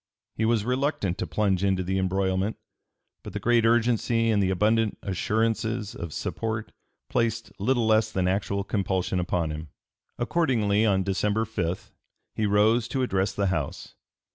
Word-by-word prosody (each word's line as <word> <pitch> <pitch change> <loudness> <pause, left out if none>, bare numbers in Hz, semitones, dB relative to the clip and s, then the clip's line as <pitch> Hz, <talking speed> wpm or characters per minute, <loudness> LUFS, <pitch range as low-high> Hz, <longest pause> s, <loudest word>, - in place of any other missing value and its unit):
He 110 - -1
was 110 -2 +2
reluctant 125 - -1
to - - -2
plunge 100 -3 +1
into 95 -2 +1
the 95 +2 -1
embroilment; 95 +2 0 0.6
but 105 - -9
the 105 - -3
great 115 +2 +3
urgency 115 0 +2
and 105 -2 +3
the 95 - +2
abundant 105 +3 +2
assurances 110 +2 -1
of 85 -2 -6
support 110 +6 -3 0.4
placed 115 -4 -1
little 120 +3 +1
less 110 0 +3
than 95 -3 0
actual 100 +1 0
compulsion 95 -3 -1
upon 85 -2 -1
him. 75 0 -6 0.5
Accordingly 115 -7 +2
on 95 -2 +2
December 105 +3 0
5 90 -5 -3 0.4
he 110 - 0
rose 110 +3 +3
to 130 -2 -1
address 95 -5 0
the 100 - 0
House. 75 -6 -4
105 Hz, 150 wpm, -26 LUFS, 95-115 Hz, 0.6 s, great